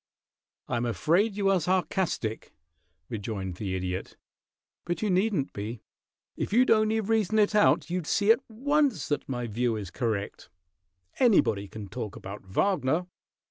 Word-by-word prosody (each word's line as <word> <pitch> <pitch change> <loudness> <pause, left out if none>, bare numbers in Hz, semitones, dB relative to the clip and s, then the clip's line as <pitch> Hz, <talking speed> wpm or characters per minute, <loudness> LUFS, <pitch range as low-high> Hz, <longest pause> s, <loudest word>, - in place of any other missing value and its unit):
"I 120 - -1
am 120 +1 -1
afraid 175 - +1
you 200 -1 +2
are 190 -3 +2
sarcastic," 180 - -1 0.5
rejoined 100 -4 -4
the 95 -2 -3
Idiot. 90 0 -4 0.7
"But 175 +4 -3
you 210 - +1
needn't 185 -6 +1
be; 105 +3 -6 0.5
if - - -3
you'd 245 +4 +4
only 215 0 +3
reason 220 -1 +1
it 210 0 +3
out 210 -4 +3
you'd 180 -3 -2
see 205 +2 +4
at 235 +3 +3
once 270 - +1
that 145 - -2
my 125 -2 -2
view 115 +1 0
is 100 -4 -6
correct. 110 -7 -3 0.7
Anybody 115 - +3
can 105 0 -8
talk 105 +1 -6
about 100 +2 -8
Wagner. 160 - +1
160 Hz, 145 wpm, -28 LUFS, -, 0.7 s, you'd